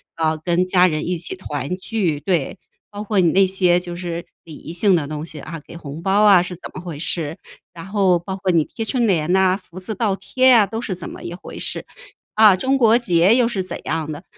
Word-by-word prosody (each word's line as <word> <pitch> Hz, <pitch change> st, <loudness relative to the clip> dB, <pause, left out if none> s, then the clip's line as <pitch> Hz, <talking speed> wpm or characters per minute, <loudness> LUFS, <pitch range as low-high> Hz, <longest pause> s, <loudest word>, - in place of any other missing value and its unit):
啊， 160 Hz, -1 st, 0 dB
跟 175 Hz, +3 st, 0 dB
家 185 Hz, 0 st, +5 dB
人 155 Hz, -2 st, -2 dB
一 180 Hz, 0 st, -1 dB
起 170 Hz, +3 st, -2 dB
团 145 Hz, -3 st, -4 dB
聚。 185 Hz, -7 st, -2 dB
对， 160 Hz, 0 st, -1 dB, 0.3 s
包 205 Hz, 0 st, -7 dB
括 215 Hz, -1 st, -2 dB
你 170 Hz, -3 st, +4 dB
那 195 Hz, 0 st, +4 dB
些 185 Hz, -2 st, +2 dB
就 175 Hz, -1 st, -7 dB
是 175 Hz, -1 st, -5 dB, 0.2 s
礼 165 Hz, -, -12 dB
仪 165 Hz, -, -9 dB
性 195 Hz, +3 st, +2 dB
的 155 Hz, -4 st, -1 dB
东 150 Hz, +1 st, -5 dB
西 155 Hz, -2 st, -10 dB
啊， 165 Hz, +2 st, -8 dB
给 -, -, -12 dB
红 150 Hz, -1 st, -8 dB
包 195 Hz, +2 st, +2 dB
啊 195 Hz, -4 st, +7 dB
是 180 Hz, +1 st, -5 dB
怎 -, -, -9 dB
么 185 Hz, -, -7 dB
回 170 Hz, -5 st, -7 dB
事？ 165 Hz, -1 st, -3 dB, 0.4 s
然 170 Hz, +1 st, -9 dB
后 195 Hz, -3 st, +2 dB
包 190 Hz, +3 st, -6 dB
括 190 Hz, -1 st, -1 dB
你 165 Hz, -3 st, +3 dB
贴 225 Hz, -, -6 dB
春 240 Hz, +1 st, 0 dB
联 170 Hz, -4 st, +1 dB
呐， 190 Hz, 0 st, +3 dB
福 185 Hz, -3 st, -12 dB
字 200 Hz, +4 st, -4 dB
倒 200 Hz, -1 st, 0 dB
贴 255 Hz, +7 st, +2 dB
呀， 230 Hz, -5 st, +6 dB
都 225 Hz, +3 st, -5 dB
是 215 Hz, -, -3 dB
怎 180 Hz, -, -7 dB
么 -, -, -10 dB
一 170 Hz, -, -6 dB
回 180 Hz, -, -10 dB
事？ -, -, -3 dB, 0.5 s
啊， 215 Hz, -3 st, +7 dB
中 265 Hz, +7 st, +1 dB
国 230 Hz, -3 st, +5 dB
结 185 Hz, -4 st, +3 dB
又 245 Hz, -2 st, +3 dB
是 200 Hz, -5 st, -2 dB
怎 185 Hz, -, -6 dB
样 155 Hz, -1 st, -2 dB
的？ 150 Hz, +5 st, -8 dB
180 Hz, 260 characters per minute, -20 LUFS, 165-200 Hz, 0.5 s, 啊